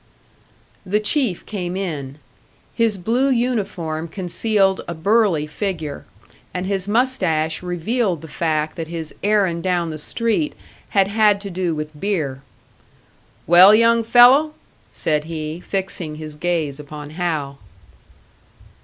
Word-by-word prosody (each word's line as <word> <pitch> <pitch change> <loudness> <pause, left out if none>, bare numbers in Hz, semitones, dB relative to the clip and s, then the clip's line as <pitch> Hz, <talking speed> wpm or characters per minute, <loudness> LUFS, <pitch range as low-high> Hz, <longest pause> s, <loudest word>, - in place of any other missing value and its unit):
The 205 +2 0
Chief 215 - 0
came 185 -3 -4
in. 145 -8 -4 0.6
His 225 -4 +1
blue 235 +9 +1
uniform 195 -11 -1
concealed 195 +3 0
a 170 - -4
burly 195 -2 +2
figure, 155 -2 -4 0.5
and 180 0 -2
his 195 -1 -2
moustache 185 -10 +1
revealed 180 - -1
the - - -8
fact 155 0 -1
that 165 -1 -4
his 165 -2 -6
errand 200 -5 +2
down 175 -2 0
the 155 - -5
street 230 - -1 0.4
had 195 -1 +5
had 205 0 +3
to 200 -1 -6
do 175 -2 -1
with 150 0 -6
beer. 155 -10 -2 1.0
"Well, 180 +5 +8
young 230 +1 +4
fellow?" 250 +7 +6 0.4
said 150 -2 -1
he, 160 0 -5
fixing 180 -4 -4
his 155 -1 -8
gaze 155 -3 -2
upon 150 0 -9
Hal. 155 -5 -3
180 Hz, 125 wpm, -20 LUFS, 155-210 Hz, 1.0 s, Well